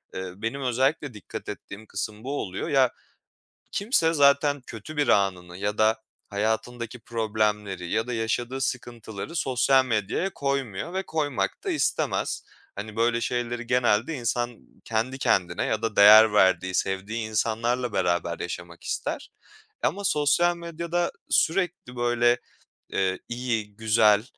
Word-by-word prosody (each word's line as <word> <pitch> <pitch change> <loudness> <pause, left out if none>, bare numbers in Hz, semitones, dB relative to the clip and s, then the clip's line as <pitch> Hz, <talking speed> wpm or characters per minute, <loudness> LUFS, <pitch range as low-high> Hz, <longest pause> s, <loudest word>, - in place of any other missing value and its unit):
Iıı, 95 +1 -6
benim 120 +5 -2
özellikle 135 +2 0
dikkat 105 -4 -8
ettiğim 105 +2 -8
kısım 105 +2 -5
bu 140 +2 -3
oluyor. 95 0 -4
Ya, 135 -3 +4 0.8
kimse 195 -6 +2
zaten 145 -1 +4
kötü 115 +8 -9
bir 145 - +1
anını 90 -3 +1
ya 105 +2 -2
da 110 +1 +3 0.3
hayatındaki 110 +3 -2
problemleri 105 -5 -1
ya 110 +2 0
da 125 - -4
yaşadığı 120 +3 -1
sıkıntıları 120 - -4
sosyal 130 -2 +3
medyaya 115 - -1
koymuyor 140 - -2
ve 190 +1 -1
koymak 150 -7 -1
da - - -1
istemez. - - 0 0.3
Hani, 105 +2 -7
böyle 115 +1 +2
şeyleri 120 -1 -2
genelde 125 +3 +2
insan 120 -2 -1 0.3
kendi 115 +4 -1
kendine 90 -8 +1
ya 110 - -1
da 110 -2 -2
değer 105 +1 +9
verdiği, 95 -2 +3
sevdiği 105 +4 -1
insanlarla 115 +2 0
beraber 85 -2 0
yaşamak 85 -1 -7
ister. - - -3 0.5
Ama 200 +1 0
sosyal 170 +1 +3
medyada 170 +1 -2 0.2
sürekli 175 -8 +1
böyle, 120 0 +3 0.6
ııı, 95 -1 +1
iyi, 115 -4 -3
güzel 110 -1 +4
115 Hz, 130 wpm, -26 LUFS, 105-135 Hz, 0.8 s, değer